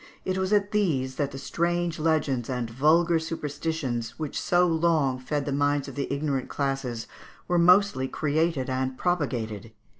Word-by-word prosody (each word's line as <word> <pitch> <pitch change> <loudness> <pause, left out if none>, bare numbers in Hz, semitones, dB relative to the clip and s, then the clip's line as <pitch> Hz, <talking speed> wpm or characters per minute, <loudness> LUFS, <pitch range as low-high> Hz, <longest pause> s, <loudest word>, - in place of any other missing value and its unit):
It 185 - 0
was 190 +1 -1
at 205 -1 +2
these 140 -11 0
that 145 -2 0
the 135 - -8
strange 170 +3 -1
legends 150 -6 0
and 125 -2 -2
vulgar 165 +6 +3
superstitions, 145 -7 -3
which 155 -3 -3
so 180 0 +3
long 160 -6 +2
fed 145 +2 -2
the 145 - -2
minds 145 0 +1
of - - -7
the 140 -1 -3
ignorant 140 -2 -1
classes, 135 -5 -2 0.4
were 175 -1 +2
mostly 180 -6 +4
created 155 -1 0
and 130 0 -2
propagated. 115 - -2
145 Hz, 155 wpm, -26 LUFS, 130-170 Hz, 0.4 s, mostly